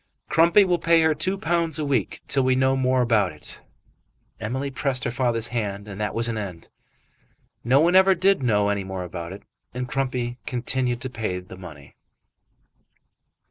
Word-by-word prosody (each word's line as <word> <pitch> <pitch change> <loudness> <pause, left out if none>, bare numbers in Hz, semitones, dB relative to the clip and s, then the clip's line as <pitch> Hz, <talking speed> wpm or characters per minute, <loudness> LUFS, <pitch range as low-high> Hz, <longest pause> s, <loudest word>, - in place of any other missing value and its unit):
"Crumpy 170 +5 +5
will 175 -2 +1
pay 165 0 +4
her 160 0 +3
two 185 +6 -1
pounds 170 -3 0
a 155 - -1
week 140 -2 -1
till 135 - +2
we 130 0 +2
know 130 +1 +2
more 130 -1 +2
about 110 -6 +2
it." 75 - -9 0.8
Emily 130 +6 -3
pressed 130 -1 -1
her 120 - -1
father's 120 -2 0
hand 105 -4 -3
and 100 0 -7
that 105 - -2
was 115 +1 +2
an 115 -2 -2
end. 90 -5 -7 0.9
No 130 +4 +4
one 175 +3 +3
ever 190 0 +6
did 195 -1 +3
know 105 -5 +2
any 100 -1 -1
more 95 -1 -5
about 85 -1 -7
it, 95 - -10 0.3
and 125 0 -3
Crumpy 125 -2 -2
continued 125 0 -1
to 130 - -3
pay 110 -6 -3
the 90 +1 -12
money. 80 -7 -12
125 Hz, 180 wpm, -24 LUFS, 105-140 Hz, 0.9 s, ever